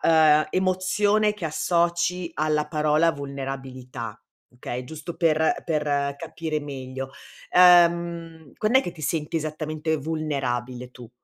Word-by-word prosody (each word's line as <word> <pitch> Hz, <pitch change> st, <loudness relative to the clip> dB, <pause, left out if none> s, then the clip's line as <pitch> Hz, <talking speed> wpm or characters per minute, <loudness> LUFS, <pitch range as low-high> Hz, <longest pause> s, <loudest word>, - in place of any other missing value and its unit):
ehm, 155 Hz, -2 st, +5 dB
emozione 205 Hz, +3 st, +2 dB
che 195 Hz, -5 st, -7 dB
associ 170 Hz, +2 st, 0 dB
alla 150 Hz, 0 st, 0 dB
parola 155 Hz, +1 st, +2 dB
vulnerabilità? 130 Hz, -5 st, -6 dB, 0.3 s
Okay, 125 Hz, 0 st, -6 dB
giusto 160 Hz, +4 st, -8 dB
per 160 Hz, -2 st, +3 dB
per 145 Hz, -3 st, 0 dB
capire 155 Hz, 0 st, -4 dB
meglio. 135 Hz, -2 st, -6 dB, 0.4 s
Ehm, 170 Hz, -3 st, +4 dB
quand'è 240 Hz, +5 st, +3 dB
che 175 Hz, -, -5 dB
ti 155 Hz, -, -12 dB
senti 155 Hz, +2 st, -1 dB
esattamente 155 Hz, 0 st, -2 dB
vulnerabile 130 Hz, -5 st, -3 dB
tu? 120 Hz, -2 st, -13 dB
155 Hz, 110 wpm, -25 LUFS, 140-170 Hz, 0.4 s, ehm